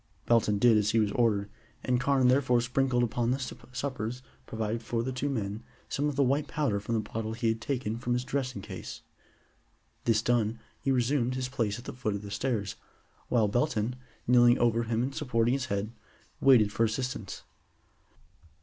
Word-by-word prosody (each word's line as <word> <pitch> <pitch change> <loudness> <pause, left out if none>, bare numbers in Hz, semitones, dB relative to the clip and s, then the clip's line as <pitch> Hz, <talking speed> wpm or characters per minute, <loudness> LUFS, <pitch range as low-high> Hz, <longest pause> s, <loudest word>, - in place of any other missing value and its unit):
Belton 110 -3 +3
did 115 +1 +5
as 105 0 +1
he 115 - +3
was 105 -2 +2
ordered, 105 -3 +2 0.4
and 125 -1 +1
Carne 135 -2 +3
thereupon 125 -1 +4
sprinkled 125 0 +1
upon 120 0 0
the 130 - +2
suppers 125 -2 -5 0.2
provided 110 +1 -2
for 115 0 -2
the 130 - -2
two 130 +3 -2
men 105 -4 -3 0.3
some 145 +2 0
of 145 - -4
the 140 - +3
white 140 +3 +1
powder 140 -10 0
from 110 +3 -2
the 110 - +1
bottle 110 0 -3
he 115 0 0
had 110 0 -1
taken 115 -3 -2
from 120 0 -1
his 125 0 0
dressing 130 -6 -3
case. - - -8 1.0
This 110 -2 +3
done, 115 -2 +1 0.2
he - - -2
resumed 125 0 +1
his 130 -1 -2
place 115 -5 -1
at 120 - -11
the - - -6
foot 115 -5 -2
of 100 - -6
the 100 - -8
stairs, 105 -2 -2 0.5
while 115 -4 +3
Belton, 120 0 0 0.3
kneeling 120 0 +6
over 115 -1 +2
him 115 +1 0
and 135 +2 -2
supporting 120 -4 +1
his 135 -2 -1
head, 100 -1 -2 0.5
waited 120 -6 +5
for 115 - +1
assistance. 115 -2 -3
120 Hz, 185 wpm, -29 LUFS, 110-130 Hz, 1.0 s, kneeling